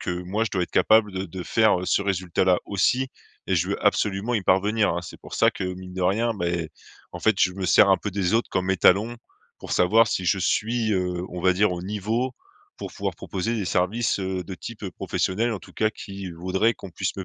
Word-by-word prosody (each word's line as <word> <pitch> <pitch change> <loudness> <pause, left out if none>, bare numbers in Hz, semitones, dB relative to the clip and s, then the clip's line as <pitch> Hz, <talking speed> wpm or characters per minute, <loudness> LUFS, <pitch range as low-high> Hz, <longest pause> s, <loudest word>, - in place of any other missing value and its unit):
que - - -3
moi, 105 +5 -1
je 115 - -3
dois 90 -2 0
être - - -19
capable 110 -2 +4
de 95 0 -3
de 90 +1 -7
faire 110 +1 +3
ce - - +2
résultat-là 95 -1 +1
aussi 125 +6 +1 0.4
et - - +2
je - - 0
veux - - -3
absolument 105 +4 +1
y 105 - 0
parvenir, 100 +4 +2
hein? 85 - -2
C'est 85 - -11
pour - - -9
ça - - +4
que, - - -5
mine 90 0 -6
de 95 - -4
rien 110 +6 +1
beh, 90 -4 -3 0.2
mais 80 - -7 0.4
en 90 - -6
fait, 110 +3 +3
je 95 - +4
me 95 +1 -5
sers 100 - +6
un 95 - +5
peu 105 +2 -5
des 95 0 0
autres 115 - +1
comme 95 +1 0
étalons 100 +5 +3 0.4
pour - - -7
savoir 110 +6 +4
si 95 -3 -2
je 95 - +2
suis, 110 +4 0
heu, 90 -1 -1
on 90 - -6
va 95 +1 +4
dire, 105 0 +2
au 90 -1 -5
niveau 105 +6 -2 0.4
pour - - -7
pouvoir - - -3
proposer 100 +4 -3
des 105 - -2
services, 95 +6 0
heu, 95 -1 -3
de 95 +2 -7
type, 115 +4 -9
heu, 95 - -4
professionnel, 115 +6 -1
en 105 - -3
tout - - -15
cas 110 0 +1
qui 100 -3 -8
voudraient 95 +6 0
qu'on 95 - -10
puisse 85 - -3
me 95 - -5
95 Hz, 235 wpm, -24 LUFS, 90-110 Hz, 0.4 s, sers